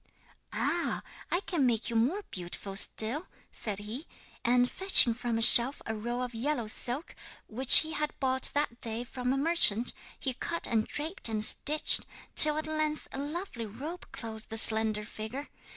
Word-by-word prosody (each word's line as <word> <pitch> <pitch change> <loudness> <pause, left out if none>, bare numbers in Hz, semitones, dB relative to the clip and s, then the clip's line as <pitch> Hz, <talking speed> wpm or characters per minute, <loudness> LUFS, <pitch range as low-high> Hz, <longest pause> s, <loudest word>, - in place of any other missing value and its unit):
'"Ah! - - -4 0.3
I 350 - -3
can 325 -10 -3
make 235 -1 -3
you - - -7
more 280 - -2
beautiful 185 +2 -10
still," 225 - +2 0.2
said 210 -3 -8
he. 215 +9 -9 0.4
And 245 +1 0
fetching 380 -8 +6
from 235 -1 -5
a 225 - +5
shelf 245 +3 +8
a 220 - -6
roll 240 +3 -6
of 250 -1 -8
yellow 245 +1 -5
silk 245 +7 -6 0.3
which 250 +4 +6
he 315 - -7
had 300 -1 -6
bought 260 -1 -2
that 285 -5 -4
day 230 0 -6
from 250 0 -6
a 270 - -3
merchant, 270 -7 0 0.3
he 265 - -5
cut 335 +7 -7
and 220 -2 -3
draped 310 -3 -4
and 215 -1 -2
stitched, 300 +7 +3 0.3
till 305 0 +7
at 310 - -5
length 310 -1 -5
a - - -9
lovely 290 - -8
robe 295 - -11
clothed 220 -2 -12
the 225 - -3
slender 220 -1 +3
figure. 230 +6 -10
245 Hz, 170 wpm, -27 LUFS, 225-300 Hz, 0.4 s, shelf